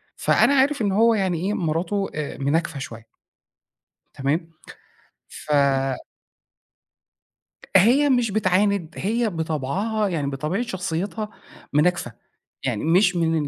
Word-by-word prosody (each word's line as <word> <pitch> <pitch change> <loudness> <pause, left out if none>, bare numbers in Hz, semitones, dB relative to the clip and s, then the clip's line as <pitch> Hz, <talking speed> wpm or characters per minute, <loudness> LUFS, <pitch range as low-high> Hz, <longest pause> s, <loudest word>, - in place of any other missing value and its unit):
فأنا 280 - +3
عارف 275 0 +2
إن 205 - +1
هو 225 +4 +4
يعني 190 -5 0
إيه، 210 - 0
مراته 180 +4 -1
آآ 150 -1 -4
مناكفة 145 +2 -1
شوية. 115 -4 -8 1.1
تمام؟ 150 +5 -1 0.8
ف 150 - -8 2.3
هي 245 +10 +5
مش 245 -4 +2
بتعاند، 195 -4 +1
هي 225 +3 0
بطبعها، 170 +7 -1
يعني 150 -6 -2
بطبيعة 150 - -2
شخصيّتها 195 0 -3 0.4
مناكفة، 155 -4 +1 0.5
يعني 120 -3 -1
مش 185 +3 +3
من 165 -1 +1
180 Hz, 105 wpm, -23 LUFS, 155-210 Hz, 2.3 s, هي